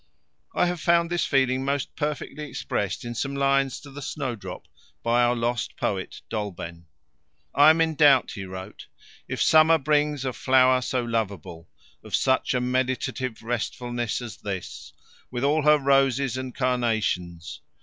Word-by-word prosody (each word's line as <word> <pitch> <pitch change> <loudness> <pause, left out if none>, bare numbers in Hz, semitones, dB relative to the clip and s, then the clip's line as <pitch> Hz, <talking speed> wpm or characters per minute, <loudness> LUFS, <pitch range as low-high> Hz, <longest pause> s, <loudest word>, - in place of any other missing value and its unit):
I - - +3
have 175 -2 -2
found 170 0 +3
this 175 -1 +1
feeling 130 -2 +2
most 140 0 -2
perfectly 150 0 -4
expressed 105 -7 -3
in 120 - -4
some 135 +4 -3
lines 135 -1 +1
to 140 - -12
the 145 +1 -9
Snowdrop 130 -7 -5 0.4
by 120 +1 +3
our 120 0 +3
lost 120 -1 -2
poet, 95 -2 -3
Dolben. 90 -6 -5 0.7
I 145 +2 +7
am 160 +1 +4
in 160 -1 +2
doubt, 145 -4 +5
he 100 -3 -6
wrote, 95 +2 -9 0.4
If - - -1
summer 160 +1 +6
brings 150 -1 +1
a 130 - -2
flower 130 0 +4
so 125 0 -1
lovable 100 -8 -4 0.3
Of - - -2
such 130 -1 +1
a - - +2
meditative 130 -1 -2
restfulness 120 0 -3
As 115 -3 -8
this, 95 -3 -6 0.4
with 125 0 -4
all 150 +3 +3
her 150 +1 +5
roses 135 -2 +2
and 130 -1 -5
carnations. 110 - -1
130 Hz, 150 wpm, -25 LUFS, 115-140 Hz, 0.7 s, I